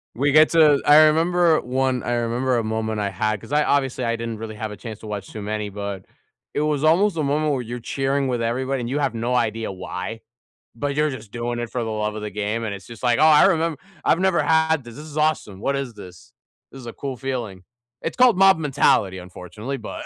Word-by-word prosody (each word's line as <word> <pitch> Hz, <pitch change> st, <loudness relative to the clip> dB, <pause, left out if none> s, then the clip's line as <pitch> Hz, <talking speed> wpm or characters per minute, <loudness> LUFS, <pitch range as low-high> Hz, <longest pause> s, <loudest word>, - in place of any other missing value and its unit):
We 140 Hz, +4 st, +1 dB
get 155 Hz, +1 st, +7 dB
to 155 Hz, -4 st, +5 dB
I 150 Hz, +1 st, +8 dB
remember 165 Hz, +1 st, +3 dB
one 130 Hz, 0 st, -1 dB
I 120 Hz, -, -1 dB
remember 120 Hz, +2 st, 0 dB
a 115 Hz, -, 0 dB
moment 110 Hz, 0 st, -2 dB
I 100 Hz, -1 st, -1 dB
had, 105 Hz, +2 st, -1 dB
'cause 145 Hz, -, -10 dB
I 150 Hz, 0 st, +4 dB
obviously 135 Hz, -3 st, 0 dB
I 115 Hz, -1 st, 0 dB
didn't 115 Hz, -1 st, -5 dB
really 110 Hz, -1 st, -7 dB
have 110 Hz, 0 st, -5 dB
a -, -, -7 dB
chance 110 Hz, -3 st, -8 dB
to 110 Hz, -, -10 dB
watch 100 Hz, -2 st, -5 dB
too 110 Hz, -, -7 dB
many, 105 Hz, 0 st, -3 dB
but 100 Hz, -1 st, -6 dB, 0.5 s
it -, -, -1 dB
was 150 Hz, -1 st, 0 dB
almost 175 Hz, +5 st, +3 dB
a 155 Hz, -, -1 dB
moment 150 Hz, +1 st, +1 dB
where 130 Hz, -, -1 dB
you're 120 Hz, +1 st, -6 dB
cheering 135 Hz, +3 st, -1 dB
with 125 Hz, -2 st, -1 dB
everybody, 130 Hz, +3 st, -1 dB
and 120 Hz, -, -4 dB
you 140 Hz, +3 st, -1 dB
have 140 Hz, -, -1 dB
no 120 Hz, +2 st, -1 dB
idea 115 Hz, -3 st, -1 dB
why, 95 Hz, +3 st, -6 dB, 0.6 s
but 140 Hz, +4 st, -3 dB
you're 150 Hz, +1 st, +2 dB
just 120 Hz, -6 st, -9 dB
doing 120 Hz, 0 st, -3 dB
it 120 Hz, -1 st, -4 dB
for 125 Hz, -, -3 dB
the 115 Hz, -, -4 dB
love 105 Hz, 0 st, -2 dB
of 110 Hz, -, -5 dB
the 105 Hz, -, -3 dB
game. 105 Hz, +3 st, -2 dB
And 105 Hz, -, -3 dB
it's 100 Hz, -1 st, -12 dB
just 115 Hz, 0 st, -12 dB
like, 120 Hz, +1 st, +2 dB
"Oh, -, -, +3 dB
I 155 Hz, -1 st, +7 dB
remem 165 Hz, -4 st, +1 dB, 0.3 s
I've -, -, +3 dB
never 185 Hz, -4 st, +2 dB
had 160 Hz, -1 st, +2 dB
this, 120 Hz, -1 st, -11 dB
this 150 Hz, -, -9 dB
is 155 Hz, -1 st, -9 dB
awesome, 150 Hz, -11 st, 0 dB
what 140 Hz, -, 0 dB
is 135 Hz, -3 st, -4 dB
this? 90 Hz, -4 st, -13 dB, 0.4 s
This 135 Hz, -, -10 dB
is 120 Hz, -, -10 dB
a 115 Hz, -, -6 dB
cool 135 Hz, -2 st, -5 dB
feeling." 120 Hz, -8 st, -5 dB, 0.4 s
It's 165 Hz, -, -4 dB
called 250 Hz, -5 st, +5 dB
mob 195 Hz, -2 st, +6 dB
mentality, 135 Hz, -10 st, +2 dB
unfortunately, 90 Hz, +8 st, -7 dB
but 115 Hz, -, -7 dB
125 Hz, 240 wpm, -22 LUFS, 110-150 Hz, 0.6 s, I